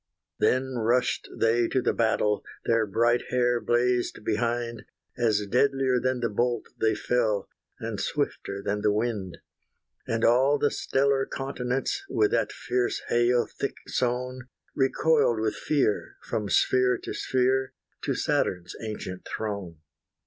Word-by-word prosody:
Then 130 Hz, -1 st, +1 dB
rushed 120 Hz, +3 st, +1 dB
they 115 Hz, +1 st, +3 dB
to 130 Hz, -, +1 dB
the -, -, +1 dB
battle; 110 Hz, -2 st, +1 dB, 0.2 s
Their 115 Hz, -2 st, +2 dB
bright 120 Hz, +4 st, +2 dB
hair 120 Hz, -1 st, +2 dB
blazed 120 Hz, 0 st, +1 dB
behind, 115 Hz, +1 st, -1 dB, 0.3 s
As 110 Hz, -4 st, +1 dB
deadlier 130 Hz, +3 st, +2 dB
than 130 Hz, 0 st, -1 dB
the 120 Hz, -, +2 dB
bolt 120 Hz, +2 st, -1 dB
they 110 Hz, 0 st, +2 dB
fell, 110 Hz, -5 st, 0 dB, 0.3 s
And -, -, -4 dB
swifter 100 Hz, 0 st, -2 dB
than 105 Hz, +1 st, -1 dB
the 105 Hz, 0 st, +3 dB
wind. 105 Hz, -4 st, -2 dB, 0.7 s
And 115 Hz, 0 st, +1 dB
all 130 Hz, +5 st, +4 dB
the 145 Hz, 0 st, +1 dB
stellar 135 Hz, 0 st, +1 dB
continents, 135 Hz, -, -2 dB
With 410 Hz, +1 st, +2 dB
that -, -, +1 dB
fierce 385 Hz, +1 st, -1 dB
hail 120 Hz, 0 st, +3 dB
thick 140 Hz, -, -4 dB
sown, 125 Hz, 0 st, -2 dB, 0.3 s
Recoiled 135 Hz, -3 st, +2 dB
with 110 Hz, -1 st, 0 dB
fear, 140 Hz, -9 st, 0 dB
from 105 Hz, -2 st, -3 dB
sphere 125 Hz, +2 st, +3 dB
to -, -, -6 dB
sphere 130 Hz, +1 st, +1 dB, 0.3 s
To -, -, -1 dB
Saturn's 90 Hz, -1 st, -1 dB
ancient 105 Hz, -4 st, -6 dB
throne. 100 Hz, -7 st, -5 dB
120 Hz, 135 wpm, -27 LUFS, 110-130 Hz, 0.7 s, all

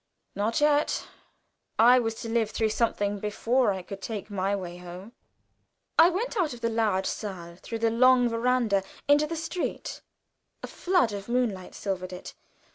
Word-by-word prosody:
not 215 Hz, +3 st, 0 dB
yet. 295 Hz, 0 st, +2 dB, 0.7 s
I 245 Hz, +3 st, +7 dB
was 225 Hz, -2 st, -2 dB
to -, -, -5 dB
live 225 Hz, -1 st, +1 dB
through 220 Hz, 0 st, 0 dB
something 205 Hz, -3 st, 0 dB
before 225 Hz, +3 st, +1 dB
I 190 Hz, -2 st, -4 dB
could 195 Hz, +1 st, -8 dB
take 210 Hz, -1 st, -5 dB
my 195 Hz, 0 st, 0 dB
way 175 Hz, -3 st, -6 dB
home. 180 Hz, +4 st, -10 dB, 0.9 s
I 330 Hz, +1 st, +9 dB
went 435 Hz, +8 st, -2 dB
out 335 Hz, -, 0 dB
of 235 Hz, -, -14 dB
the 230 Hz, -, +1 dB
large 215 Hz, -4 st, +1 dB
saal 175 Hz, -5 st, -5 dB
through 230 Hz, +5 st, -6 dB
the 225 Hz, -, +3 dB
long 250 Hz, +1 st, +5 dB
veranda 230 Hz, -3 st, +1 dB, 0.3 s
into 290 Hz, +1 st, +4 dB
the 330 Hz, -, -4 dB
street. 335 Hz, +2 st, -4 dB, 0.6 s
A -, -, -4 dB
flood 355 Hz, -, +1 dB
of 200 Hz, +2 st, -6 dB
moonlight 230 Hz, -7 st, -1 dB
silvered 185 Hz, -2 st, -4 dB
it. 180 Hz, -, -8 dB
225 Hz, 165 wpm, -27 LUFS, 195-255 Hz, 0.9 s, I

